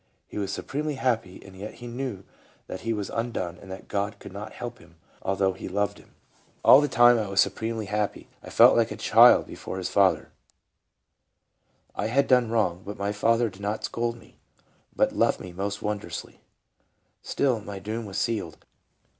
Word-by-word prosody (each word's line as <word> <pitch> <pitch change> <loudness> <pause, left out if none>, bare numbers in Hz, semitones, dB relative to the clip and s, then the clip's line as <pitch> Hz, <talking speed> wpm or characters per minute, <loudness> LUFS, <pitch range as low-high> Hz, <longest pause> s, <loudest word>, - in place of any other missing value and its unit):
He - - -7
was 100 -1 -2
supremely 150 +7 -3
happy, 115 -8 -1
and 95 -1 -13
yet 100 +3 -8
he 120 - -11
knew 120 -5 -5 0.4
that 95 - -6
he 115 - -2
was 105 -3 -3
undone 110 -7 -3
and 95 - -13
that 95 - -9
God 100 +1 -2
could 95 - -11
not 105 +2 -7
help 120 -1 -7
him, 85 - -19 0.3
although 95 0 +1
He 95 - -8
loved 100 +1 -1
him. - - -21 0.2
" - - -34
All 140 - +9
the 145 - +1
time 120 -2 +6
I 105 - -2
was 95 0 -1
supremely 110 +2 0
happy; 105 +1 -2 0.2
I - - -9
felt - - +7
like - - +3
a - - -5
little - - -7
child - - +7
before - - -7
his 95 - -3
father: 95 -2 +2 1.6
I - - -2
had 135 +5 +2
done 125 -3 +4
wrong, 105 -6 0
but 105 +1 -7
my 100 +1 -1
Father 115 +3 +2
did 95 - -14
not 105 +2 -3
scold 120 0 -2
me, 115 - -19 0.6
but - - +2
loved - - +2
me 90 - -9
most 100 +2 -4
wondronsly. 105 -1 -5 0.8
Still 130 -5 0
my 100 -1 -7
doom 110 +3 -5
was 100 0 -6
sealed. 100 -6 -2
105 Hz, 190 wpm, -26 LUFS, 95-115 Hz, 1.6 s, All